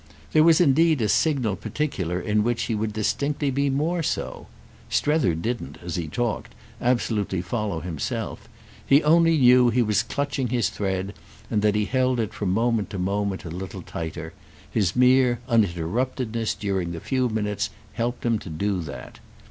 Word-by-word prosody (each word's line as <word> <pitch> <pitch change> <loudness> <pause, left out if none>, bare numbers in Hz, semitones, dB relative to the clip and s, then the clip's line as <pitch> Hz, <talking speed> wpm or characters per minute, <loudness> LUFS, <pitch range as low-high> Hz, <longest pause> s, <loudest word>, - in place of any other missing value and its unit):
There 155 - +5
was 165 -1 +6
indeed 160 -1 +4
a - - +2
signal 130 -7 +2
particular 95 - -2
in 105 +1 +1
which 120 +1 0
he 115 - -2
would 110 0 -1
distinctly 140 +7 -1
be 140 +1 +1
more 155 +6 0
so. 155 - -3 0.4
Strether 150 - +2
didn't, 85 - -4
as 85 - -3
he 85 -2 -2
talked, 120 +6 -3 0.3
absolutely 110 -7 0
follow 105 -7 -2
himself; 80 -5 -4 0.3
he 140 +3 +4
only 165 +1 +5
knew 125 -2 +6
he 120 +1 +2
was 105 -2 +2
clutching 140 -2 -2
his 120 -5 +1
thread 95 0 -3 0.4
and 105 - +1
that 105 0 +2
he 105 0 +1
held 130 +2 +1
it 110 -3 -2
from 100 - -2
moment 115 +1 +1
to 100 - -5
moment 100 +1 -1
a 85 - -6
little 90 +1 -6
tighter; 80 0 -6 0.4
his 95 -5 +1
mere 125 -1 +4
uninterruptedness 115 +3 0
during 95 -4 -2
the 85 - -5
few 130 - 0
minutes 105 -1 -1 0.2
helped 120 +1 -3
him 115 -2 +2
to 95 - -9
do 95 +5 -1
that. 70 -5 -9
110 Hz, 165 wpm, -24 LUFS, 95-130 Hz, 0.4 s, was